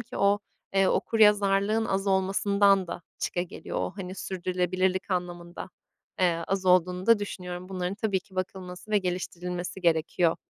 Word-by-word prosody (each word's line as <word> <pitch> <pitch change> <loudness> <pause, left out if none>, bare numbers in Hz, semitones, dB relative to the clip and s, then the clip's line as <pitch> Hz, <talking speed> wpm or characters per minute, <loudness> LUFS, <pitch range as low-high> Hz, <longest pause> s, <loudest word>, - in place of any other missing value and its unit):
ki 235 - -8
o, 200 +1 +3 0.4
eee, 195 -1 +4
okuryazarlığın 210 0 +3
az 195 0 -1
olmasından 195 0 +3
da 175 - -6 0.2
çıkageliyor. 175 0 -4
O, - - -2
hani 185 -1 -6
sürdürülebilirlik 185 +1 -1
anlamında, 175 0 -4 0.5
eee, 170 -2 +2
az 190 -1 -1
olduğunu 180 +1 +3
da 230 -2 +6
düşünüyorum. 180 -2 -6
Bunların 185 0 -3
tabii 200 -2 0
ki 190 -1 -21
bakılması 185 +2 -5
ve 210 - +4
geliştirilmesi 180 0 -4
gerekiyor. 165 0 +2
185 Hz, 135 wpm, -27 LUFS, 180-200 Hz, 0.5 s, da